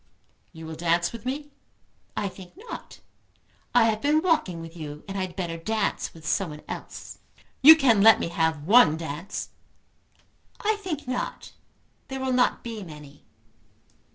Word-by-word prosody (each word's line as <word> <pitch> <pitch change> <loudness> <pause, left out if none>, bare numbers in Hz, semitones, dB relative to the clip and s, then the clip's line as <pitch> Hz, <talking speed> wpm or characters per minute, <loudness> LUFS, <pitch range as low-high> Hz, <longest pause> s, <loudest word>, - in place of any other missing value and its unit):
"You 160 0 -10
will 160 - -6
dance 170 +1 +1
with 230 +1 -8
me?" 290 +3 -4 0.7
"I 205 - 0
think 185 -1 -11
not. 455 +3 -10 0.7
I 245 - +7
have 220 -1 +1
been 305 +2 +2
walking 310 - +1
with 165 0 -9
you, 150 -3 -8
and 195 - -6
I 195 - -1
had 185 -2 -4
better 170 -3 -3
dance 215 +5 -1
with 160 -1 -15
someone 155 -6 -1
else." - - -8 0.4
"You 315 +4 +11
can 250 -9 +4
let 225 +1 +8
me - - -2
have 160 -3 0
one 200 -6 +6
dance." 165 +3 -5 1.1
"I 430 0 +1
think 335 -10 -5
not. 250 0 -4 0.6
There 265 0 -5
will 260 -1 -1
not 250 0 +2
be 230 -2 -6
many." 150 -5 -12
195 Hz, 155 wpm, -26 LUFS, 165-260 Hz, 1.1 s, You